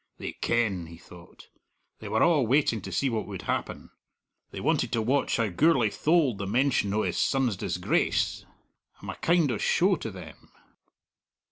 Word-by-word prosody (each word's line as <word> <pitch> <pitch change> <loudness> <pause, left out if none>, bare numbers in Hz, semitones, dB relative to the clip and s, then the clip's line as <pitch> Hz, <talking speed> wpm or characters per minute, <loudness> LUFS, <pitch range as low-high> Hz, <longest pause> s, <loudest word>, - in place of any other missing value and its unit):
"They - - -5
ken," 100 -8 -1
he 85 0 -12
thought. 85 0 -16 0.5
"They 110 - -8
were 110 +2 +1
a' 165 -4 +4
waiting 125 -2 +2
to 95 - -8
see 115 +10 0
what 115 -4 -2
would 100 -3 -7
happen. - - -4 0.6
They - - -8
wanted - - 0
to 115 - +1
watch 135 +5 +1
how 115 -2 0
Gourlay 125 - +2
tholed 150 - +1
the 100 - -4
mention 120 -2 +1
o' 110 - +1
his - - -2
son's 130 -6 +1
disgrace. - - -1 0.6
I'm - - -6
a - - -9
kind 165 -5 +2
o' 110 - -3
show 185 +1 +2
to 115 - -6
them." 90 -6 -12
115 Hz, 170 wpm, -27 LUFS, 100-140 Hz, 0.6 s, a